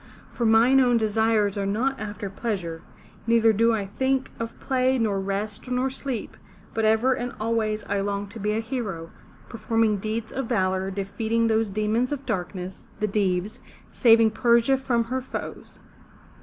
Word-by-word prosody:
For 235 - 0
mine 235 +4 +5
own 245 -2 +4
desires 220 -2 +1
are 200 - -1
not 255 +7 0
after 210 -1 -5
pleasure; 190 -5 -4 0.5
neither 230 -1 +5
do 230 +3 +3
I 215 -3 -1
think 265 +6 -1
of 230 0 -5
play 260 -1 +1
nor 210 -4 0
rest 200 +4 -4
nor 255 +1 0
sleep, 265 -4 -5 0.4
but 225 -1 0
ever 220 +4 +3
and 245 -1 -4
always 215 -1 -1
I 200 0 -1
long 200 0 -2
to 225 - -10
be 210 +1 0
a 220 - 0
hero, 215 -9 -4 0.4
performing 225 -1 +1
deeds 220 +2 -4
of 265 -2 -3
valor, 190 -4 0
defeat 200 +3 -4
ing 230 0 +3
those 220 -1 +2
demons 215 +5 0
of 280 -1 -4
darkness, 185 0 -4
the 215 - +1
Deevs, 195 0 -1 0.3
saving 230 -2 +5
Persia 235 +3 +3
from 245 -3 +1
her 255 +3 -3
foes. 260 - -7
220 Hz, 165 wpm, -25 LUFS, 205-235 Hz, 0.5 s, mine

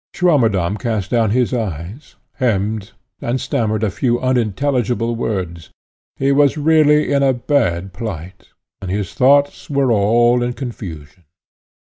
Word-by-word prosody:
Swammerdamm 115 - +2
cast 110 -6 -2
down 115 -3 +2
his 125 +3 +1
eyes, 105 - -5 0.2
hemmed, 110 -3 -1 0.3
and 120 +2 -1
stammered 115 -6 -1
a 105 - +1
few 120 +3 0
unintelligible 120 -1 0
words; 90 -8 -4 0.5
he 135 +1 +1
was 145 +1 +3
really 150 -1 +3
in 140 - +2
a 135 -1 +3
bad 105 - -1
plight, 95 -4 -7 0.3
and 95 - -6
his 100 -1 -3
thoughts 140 +2 +2
were 140 -3 +1
all 120 +3 +3
in 120 0 -1
confusion. 90 - -8
115 Hz, 130 wpm, -18 LUFS, 100-135 Hz, 0.5 s, was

